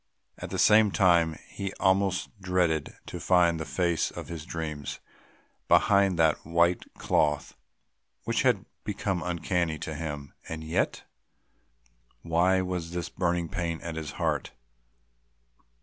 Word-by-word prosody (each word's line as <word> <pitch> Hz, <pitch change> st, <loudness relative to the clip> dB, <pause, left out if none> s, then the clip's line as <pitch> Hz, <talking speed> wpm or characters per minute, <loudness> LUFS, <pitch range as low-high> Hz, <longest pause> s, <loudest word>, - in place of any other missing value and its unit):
At -, -, -6 dB
the -, -, -3 dB
same 105 Hz, 0 st, +6 dB
time 85 Hz, -5 st, +3 dB
he 100 Hz, -1 st, -5 dB
almost 95 Hz, -2 st, +1 dB
dreaded 90 Hz, -5 st, 0 dB
to -, -, -7 dB
find 85 Hz, -2 st, +3 dB
the 80 Hz, -, -4 dB
face 85 Hz, -1 st, 0 dB
of -, -, -8 dB
his 80 Hz, -3 st, -6 dB
dreams 75 Hz, -4 st, -5 dB, 0.7 s
behind 100 Hz, -3 st, +4 dB
that 80 Hz, -2 st, +3 dB
white 85 Hz, +2 st, +1 dB
cloth 75 Hz, -1 st, +1 dB, 0.7 s
which -, -, 0 dB
had -, -, +2 dB, 0.2 s
become 95 Hz, -3 st, -2 dB
uncanny 85 Hz, -1 st, -1 dB
to 80 Hz, -, -5 dB
him... 75 Hz, -3 st, -5 dB, 0.2 s
and 80 Hz, -1 st, -5 dB
yet?... 80 Hz, +1 st, -1 dB, 1.2 s
why 90 Hz, +3 st, +3 dB
was 90 Hz, -2 st, -4 dB
this 85 Hz, -2 st, -3 dB
burning 85 Hz, 0 st, -1 dB
pain 85 Hz, -3 st, -3 dB
at 85 Hz, -2 st, -5 dB
his 80 Hz, -2 st, -5 dB
heart? -, -, -1 dB
85 Hz, 130 wpm, -28 LUFS, 80-90 Hz, 1.2 s, same